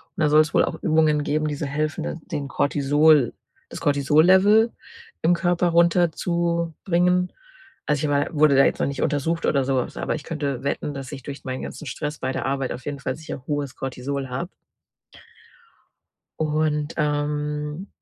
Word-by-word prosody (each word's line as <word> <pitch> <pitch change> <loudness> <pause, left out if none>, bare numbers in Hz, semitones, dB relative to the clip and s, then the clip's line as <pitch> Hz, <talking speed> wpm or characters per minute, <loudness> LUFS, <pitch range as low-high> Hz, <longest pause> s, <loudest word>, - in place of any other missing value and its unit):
und 175 - -4
da 150 - +3
soll's 155 +1 +4
wohl - - +4
auch - - -4
Übungen 155 -2 +2
geben, 155 +1 0
die 150 - -2
so 150 +1 -4
helfen, 155 +2 -2
d - - -3 0.2
den 140 -1 -3
Cortisol 145 -1 +3 0.4
das - - -8
Cortisol-Level 185 - +4 0.5
im 165 +2 +4
Körper 175 0 +1
runterzubringen. 170 +1 +1 0.5
Also, 150 0 0
ich 145 - 0
wa 145 0 +1
wurde 150 -2 +4
da 135 - +6
jetzt - - 0
noch - - +1
nicht 140 -1 -4
untersucht 160 +4 0
oder 135 -3 +2
sowas, 130 -2 -1
aber - - -1
ich 150 - -7
könnte 140 -5 -3
wetten, 140 +1 -2
dass 135 -1 -7
ich 135 -3 -8
durch 140 +1 -8
meinen 130 0 -4
ganzen - - -7
Stress 150 +3 -4
bei 130 - -2
der - - -3
Arbeit 135 -1 -1
auf 120 0 -10
jeden 145 -1 -4
Fall 135 - -3
sicher 155 -4 -8
hohes 145 -3 -2
Cortisol 135 +1 -4
habe. 170 +9 -4 1.9
Und, 155 -1 0
ähm 150 +2 -2
150 Hz, 170 wpm, -23 LUFS, 140-165 Hz, 1.9 s, da